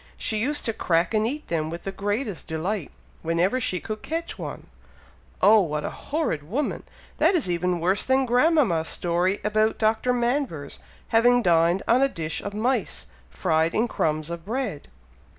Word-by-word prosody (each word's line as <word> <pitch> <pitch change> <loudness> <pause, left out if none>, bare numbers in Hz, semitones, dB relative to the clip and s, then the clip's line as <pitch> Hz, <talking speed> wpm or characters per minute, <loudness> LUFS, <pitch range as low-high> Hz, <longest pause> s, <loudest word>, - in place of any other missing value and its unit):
She 220 - -1
used 290 +6 -1
to 225 - 0
crack 170 0 +1
and 215 0 +2
eat 295 +5 -5
them 155 -2 -1
with 170 +1 -6
the 195 - -3
greatest 205 +1 -3
delight, 165 +2 -2 0.3
whenever 175 +9 +1
she 185 -7 -1
could 215 -1 -6
catch 330 +1 -4
one." - - -6 0.8
"Oh! 215 +3 +8
what 150 -5 -1
a - - -3
horrid 295 - -2
woman! 230 - -2 0.4
That 385 - +4
is 310 - +1
even 175 0 0
worse 185 +4 +1
than 265 0 +2
grandmama's 245 - +3
story 175 +3 0
about 215 +1 +1
Dr. 220 +3 +1
Manvers 240 - -1 0.3
having 245 +2 +4
dined 170 +1 +3
on 245 +3 +4
a 275 - +4
dish 160 -8 -4
of 200 0 -6
mice, 235 0 -1 0.2
fried 160 - 0
in 230 +2 +2
crumbs 155 -5 -1
of 170 -1 -6
bread!" 220 - -3
205 Hz, 170 wpm, -25 LUFS, 170-245 Hz, 0.8 s, Oh